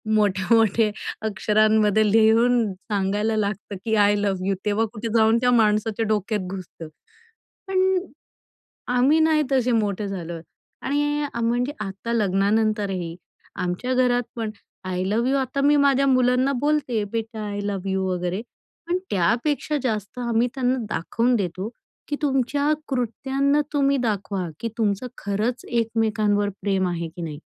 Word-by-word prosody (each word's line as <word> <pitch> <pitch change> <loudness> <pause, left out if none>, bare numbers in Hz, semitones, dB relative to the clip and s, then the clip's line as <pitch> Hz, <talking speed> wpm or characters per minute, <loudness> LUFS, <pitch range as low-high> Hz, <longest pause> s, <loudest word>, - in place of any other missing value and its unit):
मोठ्या-मोठ्या 215 +2 +3 0.4
अक्षरांमध्ये 215 0 +3
लिहून 225 0 +4
सांगायला 205 +2 -1
लागतं 205 0 -2
की 220 -1 +1
आय 205 0 +4
लव्ह 190 -2 -1
यू 195 - +1
तेव्हा 210 +2 +1
कुठे 230 +1 -5
जाऊन 225 +1 +5
त्या 250 0 +3
माणसाच्या 220 -1 +2
डोक्यात 210 0 0
घुसतं. 180 -4 -8 0.8
पण 375 -1 +2 1.0
आम्ही 280 +6 +4
नाही 315 -1 +3
तसे 255 -2 +2
मोठे 210 -2 0
झालो. 175 -3 -5 0.4
आणि 290 +1 0 0.2
म्हणजे 245 +4 0
आता 200 +5 -5
लग्नानंतरही 200 -3 0 0.4
आमच्या 180 +8 -2
घरातपण 245 -3 0 0.4
आय 180 0 -1
लव्ह 230 +6 +1
यू 275 - +2
आता 270 +1 -1
मी 290 +1 +4
माझ्या 275 -1 +3
मुलांना 255 +1 +3
बोलते, 290 -7 +1
"बेटा 225 -1 -4
आय 205 0 -4
लव्ह 195 -2 -3
यू" 190 0 0
वगैरे, 180 +2 -2 0.5
पण 355 +1 +1
त्यापेक्षा 240 - +1
जास्त 220 0 -3
आम्ही 235 0 +1
त्यांना 255 0 +1
दाखवून 235 +8 0
देतो 190 +1 -2 0.4
की 290 - -1
तुमच्या 285 +1 +1 0.2
कृत्यांना 270 +3 0
तुम्ही 280 -1 +2
दाखवा 200 -6 -2
की 230 - -3
तुमचं 210 +2 0
खरंच 210 +5 -2
एकमेकांवर 220 -3 +1
प्रेम 190 -2 +1
आहे 170 -1 -3
की 175 - -7
नाही. 150 -3 -5
220 Hz, 135 wpm, -23 LUFS, 200-250 Hz, 1.0 s, जाऊन